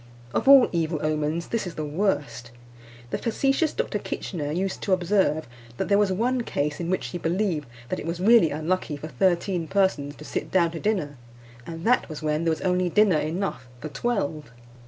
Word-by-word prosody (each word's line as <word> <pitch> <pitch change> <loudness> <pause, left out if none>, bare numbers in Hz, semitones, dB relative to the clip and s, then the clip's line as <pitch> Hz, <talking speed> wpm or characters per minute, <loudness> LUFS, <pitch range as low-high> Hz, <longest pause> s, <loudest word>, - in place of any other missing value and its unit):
Of - - -1
all 275 -2 +9
evil 165 -2 0
omens 155 +2 -1
this 230 -5 -1
is 175 - -7
the 155 - -3
worst. 150 - -1 0.6
The - - -1
facetious 270 +7 +1
Dr. - - -2
Kitchener 150 -6 -4
used 190 +4 -2
to 195 - +1
observe 180 -4 +1 0.3
that - - -2
there 200 - +5
was 205 -2 +2
one 245 +6 +1
case 150 -9 -2
in 170 -1 -3
which 185 - -1
he 175 - -5
believed 170 -3 -1 0.2
that - - -2
it - - -6
was 170 +1 -3
really 205 -3 +6
unlucky 155 0 -2
for 155 +3 -7
thirteen 175 +4 0
persons 160 -8 +1
to 150 - -12
sit - - -4
down 170 -3 +2
to 165 - -6
dinner, 180 -10 -1 0.5
and 165 0 -7
that 245 -4 +3
was 155 0 -7
when 155 +2 0
there 165 - +3
was 160 - -2
only 180 -1 +1
dinner 200 -4 +4
enough 160 -4 -3
for 155 - -6
twelve. 155 -8 -2
170 Hz, 195 wpm, -25 LUFS, 155-195 Hz, 0.6 s, all